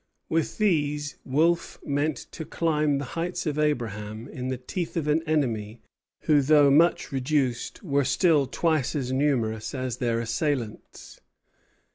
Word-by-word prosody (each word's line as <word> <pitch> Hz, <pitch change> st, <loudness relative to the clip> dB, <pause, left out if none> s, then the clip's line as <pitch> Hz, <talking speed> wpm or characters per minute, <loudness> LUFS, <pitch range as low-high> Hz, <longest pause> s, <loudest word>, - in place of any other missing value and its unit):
With 165 Hz, 0 st, 0 dB
these, 150 Hz, -8 st, 0 dB
Wolfe 165 Hz, +6 st, +1 dB
meant 145 Hz, +1 st, 0 dB
to 160 Hz, -, -6 dB
climb 155 Hz, -3 st, 0 dB
the 140 Hz, -, -3 dB
heights 175 Hz, +3 st, -3 dB
of 150 Hz, -1 st, -1 dB
Abraham 110 Hz, -6 st, -2 dB
in 130 Hz, -3 st, -6 dB
the 130 Hz, 0 st, -2 dB
teeth 165 Hz, +8 st, -4 dB
of 155 Hz, -2 st, -1 dB
an 150 Hz, +2 st, +2 dB
enemy 115 Hz, -8 st, -1 dB, 0.4 s
who, 150 Hz, -2 st, +4 dB
though 145 Hz, 0 st, +5 dB
much 160 Hz, +2 st, +3 dB
reduced, 135 Hz, -, -1 dB
were 140 Hz, -5 st, +1 dB
still 150 Hz, -2 st, +3 dB
twice 155 Hz, 0 st, 0 dB
as 130 Hz, -3 st, -2 dB
numerous 130 Hz, -5 st, 0 dB
as 130 Hz, -2 st, -3 dB
their 115 Hz, -2 st, 0 dB
assailants. 115 Hz, 0 st, -3 dB
145 Hz, 140 wpm, -26 LUFS, 125-155 Hz, 0.4 s, though